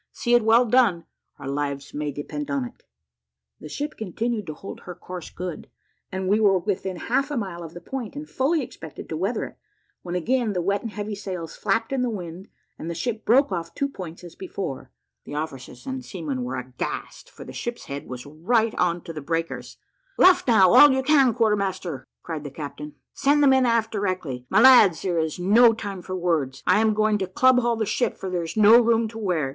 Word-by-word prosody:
See 240 - -1
it 240 -2 +5
well 230 +3 +5
done 220 -8 +3 0.3
our - - -8
lives 140 0 -3
may 150 0 -3
depend 145 +1 -6
upon 140 -3 -1
it." - - -12 0.8
The - - -9
ship 295 - -4
continued 220 +1 -3
to 155 - -5
hold 195 - -9
her 180 - -9
course 180 -1 -8
good; 180 -2 -7 0.4
and 190 0 -3
we 205 +3 +3
were 200 -3 +4
within 190 0 -2
half 270 +8 0
a 290 - -3
mile 190 -6 -4
of 165 -1 -9
the 175 - -8
point, 250 - -6
and 295 +1 -7
fully 295 +3 0
expected 160 - -10
to 160 - -3
weather 195 +9 -1
it, - - -12 0.4
when 175 0 -5
again 230 +4 0
the 180 - -1
wet 200 +2 0
and 230 - -5
heavy 210 0 -5
sails 185 -5 -6
flapped 225 +5 -1
in 265 - 0
the 250 - 0
wind, 185 -2 -7 0.3
and 165 - -5
the 170 - -4
ship 220 +6 -3
broke 260 +2 +4
off 170 -2 -4
two 280 - 0
points 180 -10 -9
as 175 -2 -10
before. 190 -7 -6 0.4
The 145 - -7
officers 150 - -6
and 265 -1 -4
seamen 155 - -4
were 125 +1 -4
aghast, 125 - -6
for - - -12
the - - -10
ship's 240 0 -5
head 140 0 -6
was 125 -1 -7
right 215 +10 0
on 175 -1 +1
to 165 - -8
the 155 - -6
breakers. 165 +3 -4 0.4
"Luff 370 -6 +5
now, 195 -7 +6
all 290 -1 +9
you 265 0 +1
can, 275 -3 +5
quarter 225 -3 +3
master," 185 -9 -4 0.2
cried 160 -3 -5
the 145 - -6
captain. 145 +1 -8 0.2
"Send 290 +1 +3
the - - +6
men 265 -1 +4
aft 230 -1 +1
directly. 185 - -3
My 215 - +4
lads, 225 -10 +7
there 175 -3 0
is 160 -1 -2
no 225 +6 +5
time 200 -4 -6
for 185 +1 -5
words 165 -7 -1
I 185 +3 +4
am 220 -1 +2
going 215 -1 +2
to 190 - -2
club 255 +7 +4
haul 240 -1 +1
the 220 -1 -1
ship, 215 +2 -1
for 190 - -5
there 180 -1 -1
is 165 +5 -6
no 215 +3 +8
room 230 -1 +2
to 225 0 -9
wear. 175 -9 0
195 Hz, 220 wpm, -24 LUFS, 165-230 Hz, 0.8 s, all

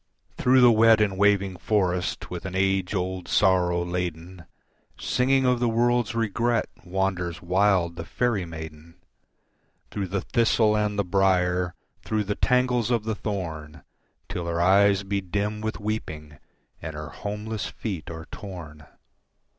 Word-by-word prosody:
Through 130 +1 +4
the 120 -1 +8
wet 110 0 +5
and 105 -3 +1
waving 100 -1 +2
forest 90 -2 -1
with 90 +1 -5
an 95 - -6
age 95 0 +1
old 90 -1 -3
sorrow 90 -3 +2
laden 90 0 -5 0.5
Singing 130 +1 +2
of 125 -1 +2
the 120 -1 +1
world's 120 0 +1
regret 115 +1 0 0.2
wanders 90 -2 -2
wild 90 -2 +2
the 85 - -4
faerie 110 0 -1
maiden, 80 0 -9 1.0
Through 100 -2 -3
the 100 +1 -2
thistle 115 -2 +2
and 105 -1 0
the 100 - +2
brier, 90 -1 +1 0.3
through 110 -1 -1
the 105 +1 -2
tangles 125 -1 +1
of 120 -3 +1
the 110 0 -2
thorn, 80 -9 -5 0.4
Till 85 -1 -4
her 85 0 -1
eyes 100 +2 +4
be 100 0 -2
dim 105 +3 -2
with 110 0 -3
weeping 80 -9 -5 0.4
and 80 - -6
her 75 +1 -6
homeless 105 +3 -5
feet 95 -8 -6
are 80 0 -7
torn. 80 -7 -9
95 Hz, 145 wpm, -25 LUFS, 90-110 Hz, 1.0 s, the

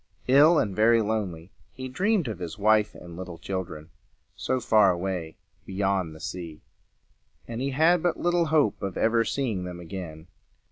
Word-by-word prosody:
Ill 145 +6 +6
and 100 -7 0
very 115 +2 +5
lonely, 100 -6 -3 0.2
he 130 0 -6
dreamed 185 - 0
of 105 -6 -5
his 85 -3 -6
wife 105 +1 +3
and 85 -1 -11
little 90 -1 -7
children 85 -5 -6 0.4
so 130 - -1
far 110 -4 +4
away 90 -2 -3 0.3
beyond 95 -4 -1
the - - -12
sea; 85 -4 -7 0.8
and 115 +1 -5
he 135 - -1
had 160 +5 +3
but 175 -1 0
little 175 -1 +1
hope 155 -8 +2
of 95 -2 -4
ever 115 +1 +3
seeing 115 -8 -2
them 90 -1 -7
again. 80 -2 -8
105 Hz, 160 wpm, -26 LUFS, 90-130 Hz, 0.8 s, Ill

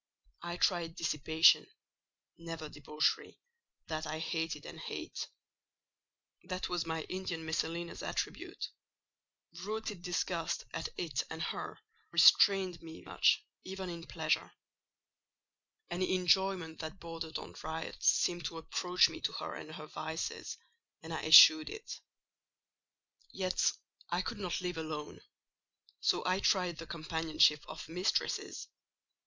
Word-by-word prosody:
I 175 0 -4
tried 170 -2 +1
dissipation—never 160 +1 0
debauchery: 150 +1 -1 0.5
that 155 0 -3
I 155 - -3
hated, 160 -2 -3
and - - -9
hate. - - -5 1.2
That 185 +1 -4
was 175 -2 -1
my 160 -1 -2
Indian 185 -3 -4
Messalina's 165 +2 -2
attribute: - - -4 0.9
rooted 210 -2 -4
disgust 175 -1 -2
at 160 - -3
it 155 -7 -1
and 160 0 -4
her - - -4 0.3
restrained 190 -4 +6
me 160 -1 -11
much, - - +3 0.2
even 190 -1 -5
in 170 -1 -8
pleasure. - - 0 1.4
Any 185 +1 0
enjoyment 185 -2 +2
that 160 +3 -6
bordered 165 -1 -5
on - - -9
riot 160 +1 -5
seemed 175 -2 +3
to 165 +3 -4
approach 180 +2 +3
me - - -8
to - - 0
her - - -5
and 155 - -8
her 155 - -8
vices, 160 +1 -5 0.5
and - - -6
I - - -3
eschewed 315 -1 +10
it. 435 +1 -8 1.3
"Yet 185 -1 +1 0.4
I 175 +1 0
could 225 +1 -5
not 180 -2 -2
live 180 -2 -3
alone; 155 -2 -5 0.8
so - - +1
I 185 +1 +2
tried 180 -4 +2
the 165 - -7
companionship 160 -2 +2
of 155 - -8
mistresses. 180 +5 -1
165 Hz, 120 wpm, -33 LUFS, 160-185 Hz, 1.4 s, eschewed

